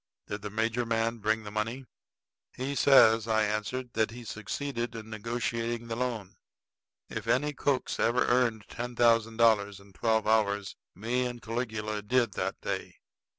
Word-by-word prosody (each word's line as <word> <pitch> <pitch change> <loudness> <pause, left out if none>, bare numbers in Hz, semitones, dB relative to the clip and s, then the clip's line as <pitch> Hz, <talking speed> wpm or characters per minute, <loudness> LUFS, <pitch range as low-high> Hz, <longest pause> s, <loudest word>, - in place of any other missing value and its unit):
Did 105 - -5
the 105 - -5
major 115 +3 0
man 115 0 0
bring 110 +1 0
the 105 - -7
money?" 115 +5 -3 0.7
"He 130 +2 -3
says," 115 -6 +6
I 110 -1 +3
answered, 110 +4 -2
"that 110 -1 +1
he 120 +1 -9
succeeded 115 +3 -4
in 110 -1 -8
negotiating 115 +1 -3
the 115 - -2
loan." 115 -5 -3 0.7
If - - -6
any 145 +3 +2
cooks 140 -2 -1
ever 120 +2 +3
earned 120 -4 +2
ten 120 0 -5
thousand 115 -1 +3
dollars 105 -4 +3
in 100 0 -18
twelve 110 +2 +1
hours, 105 -2 +1 0.2
me 120 +6 0
and 120 -1 -6
Caligula 110 -3 -3
did 120 +1 +2
that - - -3
day. - - -4
115 Hz, 155 wpm, -29 LUFS, 110-120 Hz, 0.7 s, says